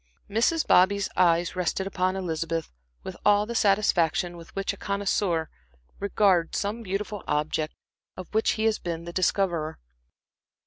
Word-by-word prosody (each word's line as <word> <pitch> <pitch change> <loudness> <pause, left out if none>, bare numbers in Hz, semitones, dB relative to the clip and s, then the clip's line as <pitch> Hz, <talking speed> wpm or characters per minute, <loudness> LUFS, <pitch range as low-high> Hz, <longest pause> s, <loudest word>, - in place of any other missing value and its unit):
Mrs. 235 +10 +1
Bobby's 200 +2 +4
eyes 170 0 +3
rested 185 +1 -1
upon 185 -1 0
Elizabeth 165 -3 -3 0.3
with - - -6
all 205 0 +4
the 235 - -5
satisfaction 195 -5 +2
with 165 -1 -12
which 195 0 -1
a - - -11
connoisseur 195 -5 0 0.5
regards 195 -4 +2
some 210 +3 -2
beautiful 200 0 -4
object 155 +1 -1 0.4
of 185 - -7
which 220 +1 +2
he 220 - -2
has 220 -1 +2
been 170 -1 -4
the 170 0 -8
discoverer. 175 -4 0
185 Hz, 140 wpm, -26 LUFS, 170-205 Hz, 0.5 s, Bobby's